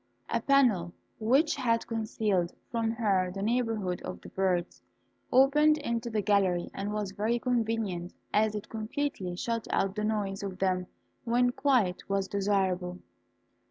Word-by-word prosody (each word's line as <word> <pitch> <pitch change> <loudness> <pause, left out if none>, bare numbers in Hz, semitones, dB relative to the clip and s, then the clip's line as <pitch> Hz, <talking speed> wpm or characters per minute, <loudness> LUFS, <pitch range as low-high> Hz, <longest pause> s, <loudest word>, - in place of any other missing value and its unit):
A - - +1
panel 230 -12 +3 0.3
which 275 +9 +3
had 230 -3 +1
concealed 215 -5 -1 0.2
from 230 -1 0
her 200 -5 +1
the 195 +1 -4
neighbourhood 220 -5 0
of 90 -1 -6
the - - -11
birds, 185 -2 -1 0.5
opened 295 +4 +5
into 235 -5 -2
the 215 -2 -1
gallery, 190 -3 +2
and 200 +1 -3
was 210 -2 -2
very 215 +4 0
convenient, 225 -7 -1 0.2
as 215 0 +3
it 210 - -5
completely 220 -4 -3
shut 230 +4 -2
out 195 -1 +1
the 210 +1 -3
noise 205 -3 -1
of 195 -2 -5
them 185 -1 0 0.4
when 245 +1 +2
quiet 250 -11 +1
was 195 -1 0
desirable. 190 -3 0
210 Hz, 145 wpm, -29 LUFS, 190-235 Hz, 0.5 s, opened